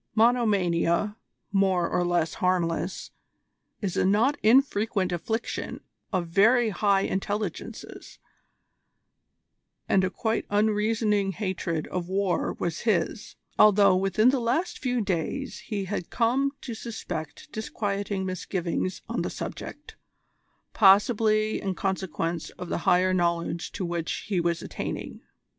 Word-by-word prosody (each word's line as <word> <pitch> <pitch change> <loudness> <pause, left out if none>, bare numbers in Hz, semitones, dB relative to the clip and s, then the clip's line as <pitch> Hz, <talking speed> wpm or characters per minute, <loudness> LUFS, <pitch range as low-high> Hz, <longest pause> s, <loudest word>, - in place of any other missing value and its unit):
Monomania, 210 -5 +2 0.4
more 190 -3 +2
or 180 - 0
less 175 -2 +1
harmless, 180 0 0 0.7
is 190 -3 -1
a - - +2
not 220 +9 +3
infrequent 220 -5 +3
affliction 220 +7 -3 0.3
of 185 -4 0
very 220 +7 +4
high 200 -1 +2
intelligences, 200 -1 -4 1.7
and 190 - +3
a 185 - +1
quite 220 +4 -2
unreasoning 210 -1 +1
hatred 180 -6 -2
of 180 -1 -4
war 190 -2 0
was 170 -2 -2
his, 210 -1 -1 0.2
although 205 -2 +6
within 195 +6 +3
the 270 - 0
last 325 +10 -1
few 250 -2 0
days 200 - -2
he 205 -4 -2
had 185 -2 -4
come 255 +4 +1
to 240 - -5
suspect 180 -9 -6
disquieting 200 -3 -3
misgivings 185 0 -3
on - - -2
the - - -2
subject, - - -7 0.8
possibly 215 +1 +4
in 190 -2 -2
consequence 175 -3 -2
of 180 - -7
the - - -1
higher 185 +1 +4
knowledge 170 -1 0
to 185 - -4
which 170 -1 -3
he 190 -4 +1
was 170 -1 -1
attaining. - - -5
195 Hz, 120 wpm, -26 LUFS, 180-220 Hz, 1.7 s, although